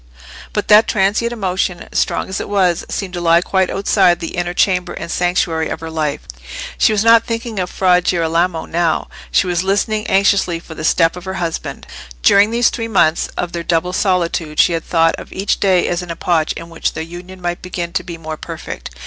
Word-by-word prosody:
But -, -, -2 dB
that 210 Hz, +1 st, +6 dB
transient 210 Hz, +3 st, +1 dB
emotion, 190 Hz, -5 st, -2 dB
strong -, -, 0 dB
as 190 Hz, -, -4 dB
it -, -, -6 dB
was, 185 Hz, -4 st, +2 dB
seemed 190 Hz, -3 st, -4 dB
to 175 Hz, -, -4 dB
lie 170 Hz, 0 st, +4 dB
quite 190 Hz, 0 st, +1 dB
outside 180 Hz, -3 st, +2 dB
the 165 Hz, -, -5 dB
inner 175 Hz, 0 st, -2 dB
chamber 180 Hz, -2 st, +1 dB
and 170 Hz, 0 st, -6 dB
sanctuary 170 Hz, -2 st, 0 dB
of -, -, -4 dB
her 165 Hz, 0 st, -7 dB
life. 155 Hz, -3 st, -2 dB, 0.6 s
She -, -, +4 dB
was 210 Hz, -1 st, +1 dB
not 230 Hz, 0 st, +6 dB
thinking 230 Hz, -2 st, -4 dB
of 180 Hz, -1 st, -2 dB
Fra 180 Hz, -1 st, +3 dB
Girolamo 170 Hz, 0 st, 0 dB
now; 170 Hz, -1 st, 0 dB, 0.2 s
she -, -, +2 dB
was 175 Hz, -1 st, 0 dB
listening 210 Hz, +3 st, 0 dB
anxiously 195 Hz, -3 st, +2 dB
for 165 Hz, -, -11 dB
the 155 Hz, -, -7 dB
step 165 Hz, +1 st, +3 dB
of 180 Hz, 0 st, -9 dB
her 190 Hz, 0 st, -4 dB
husband. 170 Hz, -2 st, -4 dB, 0.4 s
During 200 Hz, +1 st, +5 dB
these 235 Hz, +1 st, +2 dB
three 230 Hz, -1 st, -4 dB
months 170 Hz, -7 st, +2 dB
of 175 Hz, -, -2 dB
their 170 Hz, -, -4 dB
double 170 Hz, +1 st, 0 dB
solitude 170 Hz, -5 st, 0 dB
she 175 Hz, -, +5 dB
had 165 Hz, -, -2 dB
thought 165 Hz, -1 st, +3 dB
of -, -, -11 dB
each 195 Hz, +2 st, -1 dB
day 185 Hz, -3 st, +3 dB
as 175 Hz, +1 st, -1 dB
an 180 Hz, -, -9 dB
epoch 165 Hz, -1 st, 0 dB
in 165 Hz, 0 st, -9 dB
which 165 Hz, -, -2 dB
their 160 Hz, -, -4 dB
union 175 Hz, +3 st, -10 dB
might 175 Hz, -1 st, -3 dB
begin 175 Hz, -1 st, -5 dB
to -, -, 0 dB
be 170 Hz, -2 st, -7 dB
more 160 Hz, -1 st, -6 dB
perfect. -, -, -7 dB
180 Hz, 210 wpm, -17 LUFS, 165-195 Hz, 0.6 s, that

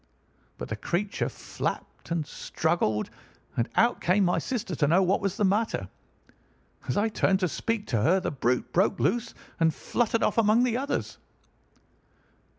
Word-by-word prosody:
But -, -, -6 dB
the 110 Hz, -, -2 dB
creature 185 Hz, -, -2 dB
flapped -, -, -5 dB
and 165 Hz, -2 st, -1 dB
struggled, 145 Hz, -10 st, -1 dB, 0.4 s
and 115 Hz, -, 0 dB
out 235 Hz, +2 st, +3 dB
came 190 Hz, +3 st, +3 dB
my 175 Hz, -, +2 dB
sister 230 Hz, -8 st, -3 dB
to 145 Hz, -, +2 dB
know 175 Hz, +6 st, +4 dB
what 185 Hz, +2 st, +2 dB
was 195 Hz, -2 st, -2 dB
the -, -, +1 dB
matter. 210 Hz, +4 st, 0 dB, 1.0 s
As -, -, -1 dB
I 205 Hz, +2 st, +3 dB
turned 195 Hz, -3 st, +1 dB
to 180 Hz, -, +3 dB
speak 220 Hz, +5 st, -2 dB
to 115 Hz, -4 st, +1 dB
her 180 Hz, -, +4 dB
the 185 Hz, -, -3 dB
brute 125 Hz, -3 st, -1 dB
broke 190 Hz, +2 st, +2 dB
loose 235 Hz, -1 st, 0 dB, 0.2 s
and 165 Hz, -1 st, +4 dB
fluttered 230 Hz, +7 st, -1 dB
off -, -, +2 dB
among 225 Hz, +2 st, +4 dB
the 245 Hz, -2 st, +1 dB
others. 275 Hz, +3 st, -2 dB
190 Hz, 160 wpm, -27 LUFS, 165-225 Hz, 1.0 s, know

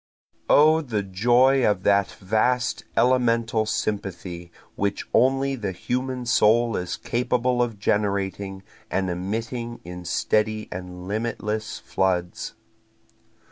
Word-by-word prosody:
O 155 Hz, +2 st, +6 dB
the 110 Hz, -9 st, -2 dB
joy 120 Hz, +7 st, +3 dB
of 100 Hz, -4 st, +2 dB
that 100 Hz, -1 st, +3 dB
vast 115 Hz, +6 st, 0 dB
elemental 115 Hz, -3 st, +2 dB
sympathy 90 Hz, -5 st, -3 dB, 0.2 s
which 100 Hz, 0 st, -2 dB
only 135 Hz, +2 st, +3 dB
the 105 Hz, -6 st, -4 dB
human 125 Hz, +5 st, -3 dB
soul 115 Hz, 0 st, +3 dB
is 90 Hz, -, -3 dB
capable 125 Hz, +1 st, 0 dB
of 115 Hz, -3 st, -1 dB
generating 100 Hz, -1 st, -1 dB, 0.3 s
and 95 Hz, -1 st, 0 dB
emitting 115 Hz, +6 st, -4 dB
in 90 Hz, 0 st, -7 dB
steady 110 Hz, +5 st, 0 dB
and 90 Hz, 0 st, -7 dB
limitless 110 Hz, 0 st, -3 dB
floods. 90 Hz, -2 st, -2 dB
110 Hz, 105 wpm, -24 LUFS, 95-120 Hz, 0.3 s, O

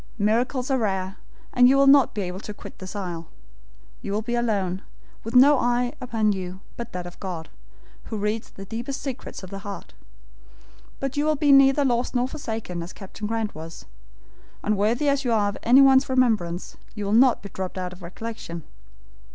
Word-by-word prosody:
Miracles 245 Hz, +5 st, +1 dB
are 265 Hz, -, +2 dB
rare, 190 Hz, -3 st, -1 dB, 0.4 s
and 245 Hz, 0 st, +6 dB
you 275 Hz, -, +5 dB
will 275 Hz, -, +5 dB
not 275 Hz, -2 st, +6 dB
be 205 Hz, -, -1 dB
able 180 Hz, +1 st, -5 dB
to 210 Hz, 0 st, -8 dB
quit -, -, -11 dB
this 185 Hz, +2 st, -8 dB
isle. 175 Hz, -5 st, -5 dB, 0.7 s
You 200 Hz, -, -4 dB
will 215 Hz, +2 st, -1 dB
be 240 Hz, +2 st, -3 dB
alone, 200 Hz, -6 st, 0 dB, 0.4 s
with 225 Hz, +2 st, -6 dB
no 275 Hz, +2 st, +7 dB
eye 245 Hz, 0 st, +1 dB
upon 225 Hz, -4 st, +1 dB
you 185 Hz, -1 st, -5 dB
but 235 Hz, 0 st, -6 dB
that 180 Hz, -1 st, -4 dB
of 175 Hz, -, -10 dB
God, 175 Hz, -4 st, -5 dB, 0.6 s
who 220 Hz, -, -4 dB
reads 210 Hz, +2 st, -2 dB
the 195 Hz, -, -10 dB
deepest 240 Hz, +7 st, -4 dB
secrets 265 Hz, -7 st, -6 dB
of 185 Hz, -, -9 dB
the 195 Hz, -, -5 dB
heart; 200 Hz, 0 st, -8 dB, 1.1 s
but 275 Hz, 0 st, -3 dB
you 290 Hz, -, +2 dB
will 310 Hz, 0 st, +3 dB
be 290 Hz, 0 st, +3 dB
neither 275 Hz, +1 st, +6 dB
lost 245 Hz, 0 st, 0 dB
nor 245 Hz, +1 st, +2 dB
forsaken, 220 Hz, -, -5 dB
as 170 Hz, +2 st, -7 dB
Captain 210 Hz, +1 st, -7 dB
Grant 225 Hz, -1 st, -2 dB
was. 160 Hz, +1 st, -9 dB, 0.8 s
Unworthy 215 Hz, +7 st, +1 dB
as 280 Hz, 0 st, +2 dB
you 245 Hz, -, 0 dB
are 210 Hz, -3 st, +3 dB
of 205 Hz, -, -6 dB
anyone's 265 Hz, +2 st, +6 dB
remembrance, 220 Hz, -10 st, +1 dB, 0.2 s
you 210 Hz, -2 st, -4 dB
will 200 Hz, -, -2 dB
not 245 Hz, 0 st, +5 dB
be 200 Hz, -, -7 dB
dropped 190 Hz, 0 st, -5 dB
out 180 Hz, -1 st, -3 dB
of 185 Hz, -, -14 dB
recollection. 175 Hz, -2 st, -7 dB
220 Hz, 190 wpm, -24 LUFS, 190-255 Hz, 1.1 s, no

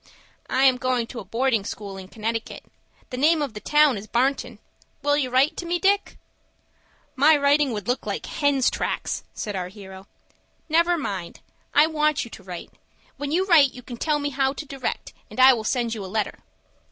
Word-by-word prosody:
"I 260 Hz, -, +2 dB
am 260 Hz, -2 st, +5 dB
going 255 Hz, -2 st, 0 dB
to 235 Hz, +1 st, -8 dB
a -, -, -7 dB
boarding 230 Hz, +2 st, 0 dB
school 200 Hz, -1 st, -6 dB
in 190 Hz, -1 st, -9 dB
Connecticut. 225 Hz, +2 st, -4 dB, 0.5 s
The 250 Hz, -, -4 dB
name 310 Hz, +4 st, +4 dB
of 285 Hz, -6 st, -2 dB
the 210 Hz, -, -7 dB
town 295 Hz, -3 st, +3 dB
is 210 Hz, -, -11 dB
Barnton. 260 Hz, +5 st, 0 dB, 0.5 s
Will 290 Hz, 0 st, +3 dB
you 275 Hz, -3 st, 0 dB
write 270 Hz, +6 st, +3 dB
to 345 Hz, -, -5 dB
me, 350 Hz, +1 st, +1 dB
Dick?" 395 Hz, +2 st, +1 dB, 1.0 s
"My 300 Hz, +3 st, +5 dB
writing 285 Hz, -1 st, +3 dB
would 210 Hz, -2 st, -5 dB
look 245 Hz, +2 st, 0 dB
like -, -, -3 dB
hens' 285 Hz, -4 st, +1 dB
tracks," -, -, -3 dB
said 210 Hz, -2 st, -4 dB
our 180 Hz, -1 st, -3 dB
hero. 190 Hz, 0 st, -12 dB, 0.6 s
"Never 340 Hz, +2 st, +3 dB
mind. 195 Hz, -, -5 dB, 0.3 s
I 295 Hz, -, +7 dB
want 305 Hz, -3 st, +1 dB
you 235 Hz, -, -12 dB
to -, -, -10 dB
write. 180 Hz, -2 st, -8 dB, 0.5 s
When 285 Hz, 0 st, -4 dB
you 365 Hz, +4 st, +2 dB
write 305 Hz, -9 st, +5 dB
you 250 Hz, -, -10 dB
can 240 Hz, 0 st, -8 dB
tell 300 Hz, +4 st, +1 dB
me 290 Hz, 0 st, -2 dB
how 270 Hz, 0 st, +1 dB
to 300 Hz, -, -7 dB
direct, 275 Hz, -2 st, -5 dB, 0.2 s
and -, -, -9 dB
I 260 Hz, +1 st, +9 dB
will 225 Hz, -3 st, -3 dB
send 235 Hz, 0 st, 0 dB
you 215 Hz, -3 st, -5 dB
a -, -, -6 dB
letter." 210 Hz, +2 st, -2 dB
260 Hz, 200 wpm, -24 LUFS, 220-295 Hz, 1.0 s, I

